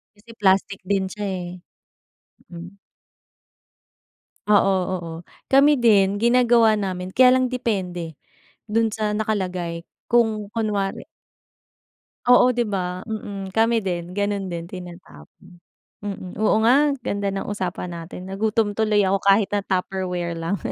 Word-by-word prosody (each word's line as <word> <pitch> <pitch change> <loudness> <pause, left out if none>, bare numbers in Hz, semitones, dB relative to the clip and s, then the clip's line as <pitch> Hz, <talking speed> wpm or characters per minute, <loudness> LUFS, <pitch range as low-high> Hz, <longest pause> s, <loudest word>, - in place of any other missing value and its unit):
Kasi 205 +3 -23
plastic 195 0 +2
din 195 -1 +1
siya 210 +1 -5
eh. 185 -2 -4 1.0
Mm. 175 +3 -10 1.7
Oo, 200 -1 +5 0.2
oo. 170 -2 -5 0.4
Kami 280 +2 +6
din 205 -2 +3
ginagawa 235 -2 +4
namin 185 -2 -3
kaya 255 +5 +5
lang 255 -1 +2
depende, 185 -9 -3 0.5
do'n 225 +1 +1
sa 215 -1 -2
nakalagay. 185 -6 -2 0.2
Kung 220 -3 +1
kunwari 210 -3 -2 1.2
Oo, 245 0 +6
'di 240 -1 0
ba? 185 -2 -3
Mm, 200 -3 -6
kami 225 -1 +2
din, 175 -1 -3
gano'n 200 -2 -1
din, 170 -1 -5
tinatapon. 175 - -13 0.4
Mm. 195 -3 -6
Oo 215 - +3
nga, 280 +5 +5 0.2
ganda 200 0 -1
ng 195 0 -4
usapan 185 -3 -4
natin, 170 +2 -8
nagutom 205 +2 0
tuloy 210 -2 +2
ako 195 +1 +2
kahit 200 +1 +3
na 205 - +1
Tupperware 180 -2 -2
lang. 165 +4 -2
200 Hz, 125 wpm, -22 LUFS, 180-220 Hz, 1.7 s, Kami